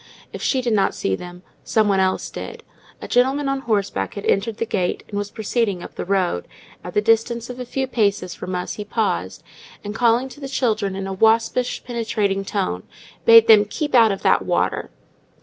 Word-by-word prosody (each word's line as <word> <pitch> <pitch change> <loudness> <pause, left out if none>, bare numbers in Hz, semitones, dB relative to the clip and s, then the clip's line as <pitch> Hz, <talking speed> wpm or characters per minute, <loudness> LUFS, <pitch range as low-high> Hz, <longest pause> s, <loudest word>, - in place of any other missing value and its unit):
If - - -7
she 265 - +1
did 240 -2 0
not 195 -2 +2
see 95 - -1
them, 180 - -10 0.2
some 215 -1 +2
one 195 -1 +2
else 190 0 0
did—a 460 0 -10
gentleman 270 +3 +2
on 275 0 0
horseback 200 - -1
had 200 - -6
entered 220 +2 0
the - - -1
gate 185 -5 -2
and 205 - -8
was 205 0 -2
proceeding 215 -4 -1
up - - -9
the - - -5
road; 185 - 0 0.4
at 180 - -8
the 210 - +4
distance 230 +2 +1
of 250 - -10
a 250 - -4
few 265 +2 -2
paces 200 -7 0
from 185 +2 -5
us 180 - -3
he 210 - -6
paused, 205 - -2 0.4
and 205 - -5
calling 235 +2 +2
to 285 - -13
the 275 -2 -6
children 215 -7 0
in 195 0 -4
a 195 - -4
waspish 225 +4 +2
penetrating 215 -5 -1
tone, 190 - -2 0.4
bade 230 -1 +9
them 215 -2 +8
"keep 295 +8 -4
out 230 -4 +6
of 195 - -4
that - - +4
water." - - -1
215 Hz, 200 wpm, -21 LUFS, 195-240 Hz, 0.4 s, bade